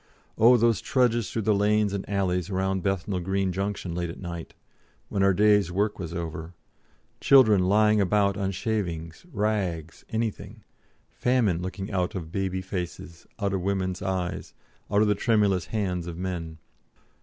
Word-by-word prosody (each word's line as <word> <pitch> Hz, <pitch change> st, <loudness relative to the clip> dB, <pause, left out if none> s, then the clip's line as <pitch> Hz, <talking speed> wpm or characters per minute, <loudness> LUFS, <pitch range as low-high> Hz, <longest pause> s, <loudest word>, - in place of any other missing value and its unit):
Oh, 120 Hz, +3 st, +6 dB
those 115 Hz, -2 st, +2 dB
trudges 120 Hz, -5 st, +1 dB
through 110 Hz, -, -3 dB
the 110 Hz, +1 st, +3 dB
lanes 105 Hz, 0 st, +2 dB
and 100 Hz, -1 st, -4 dB
alleys 95 Hz, -2 st, 0 dB
round 95 Hz, 0 st, -1 dB
Bethnal 95 Hz, 0 st, -1 dB
Green 95 Hz, +1 st, -1 dB
Junction 95 Hz, -2 st, -3 dB
late 85 Hz, 0 st, -2 dB
at 85 Hz, -, -8 dB
night, 85 Hz, -3 st, -7 dB, 0.5 s
when 100 Hz, -, -1 dB
our 100 Hz, 0 st, +5 dB
day's 105 Hz, -2 st, +3 dB
work 105 Hz, +3 st, 0 dB
was 85 Hz, -3 st, -5 dB
over; 85 Hz, 0 st, -5 dB, 0.6 s
children 110 Hz, -9 st, +6 dB
lying 105 Hz, +1 st, +4 dB
about 100 Hz, 0 st, +2 dB
on 95 Hz, 0 st, -1 dB
shavings, 95 Hz, -, -3 dB
rags, 95 Hz, -, -2 dB
anything; 110 Hz, -1 st, -4 dB, 0.5 s
famine 115 Hz, -9 st, +1 dB
looking 95 Hz, +3 st, -5 dB
out 90 Hz, -2 st, -1 dB
of 80 Hz, -4 st, -5 dB
baby 95 Hz, -1 st, -2 dB
faces, 90 Hz, -2 st, -6 dB
out 100 Hz, -2 st, -1 dB
of 95 Hz, -, -1 dB
women's 95 Hz, -1 st, -1 dB
eyes, 95 Hz, -2 st, -3 dB, 0.3 s
out 105 Hz, +1 st, +3 dB
of -, -, +2 dB
the 105 Hz, -, +4 dB
tremulous 105 Hz, -4 st, +1 dB
hands 90 Hz, -5 st, -2 dB
of 85 Hz, -1 st, -6 dB
men. 85 Hz, -3 st, -4 dB
95 Hz, 155 wpm, -26 LUFS, 90-105 Hz, 0.6 s, Oh